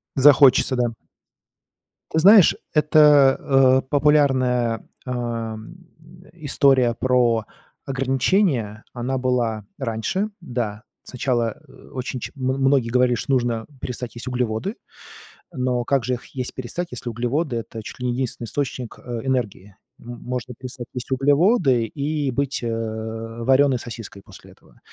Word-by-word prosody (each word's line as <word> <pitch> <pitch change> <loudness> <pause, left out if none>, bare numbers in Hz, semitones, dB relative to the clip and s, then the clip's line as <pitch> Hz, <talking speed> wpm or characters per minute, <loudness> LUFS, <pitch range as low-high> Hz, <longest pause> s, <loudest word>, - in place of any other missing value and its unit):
Захочется, 135 -1 +6
да. 120 -1 0 1.2
Ты 160 - 0
знаешь, 195 +2 +7 0.2
это, 150 -3 +5
э, 135 -1 +4
популярная, 130 -5 +2 0.2
ам, 115 0 -4 0.5
э, - - -19
история 135 -6 +2
про 120 -3 +1 0.4
ограничения, 135 - 0
она 130 +2 -3
была 120 -4 -1
раньше 135 - -2
да. 120 -8 -4 0.2
Сначала, 120 -3 -1
э, - - -17 0.2
очень 130 -1 -4
ч - - -6
м 135 - -9 0.2
многие 135 -3 +3
говорили, 125 0 +3
что 135 - -3
нужно 120 -3 0
перестать 125 -1 -5
есть 120 +2 -6
углеводы. 125 - -2 0.8
Но 125 -2 -1
как 135 0 +1
же 125 - 0
их 125 - -5
есть 125 -2 -4
перестать, 135 +8 -5
если 125 -1 -5
углеводы- 125 +5 -2
это 115 0 -7
чуть 110 - -10
ли 125 - -4
не 125 - 0
единственный 125 -2 -3
источник, 130 0 -4
э, 120 -2 -6
энергии? 105 -7 -2 0.2
М 120 0 -9
можно 125 0 -5
перестать 125 0 -9
есть 125 +1 -6
углеводы 140 - +3
и 145 +4 -2
быть, 140 +2 -2
э, - - -1 0.8
варёной 135 +1 +3
сосиской 115 -4 -9
после - - -15
этого. - - -23
125 Hz, 135 wpm, -22 LUFS, 120-140 Hz, 1.2 s, знаешь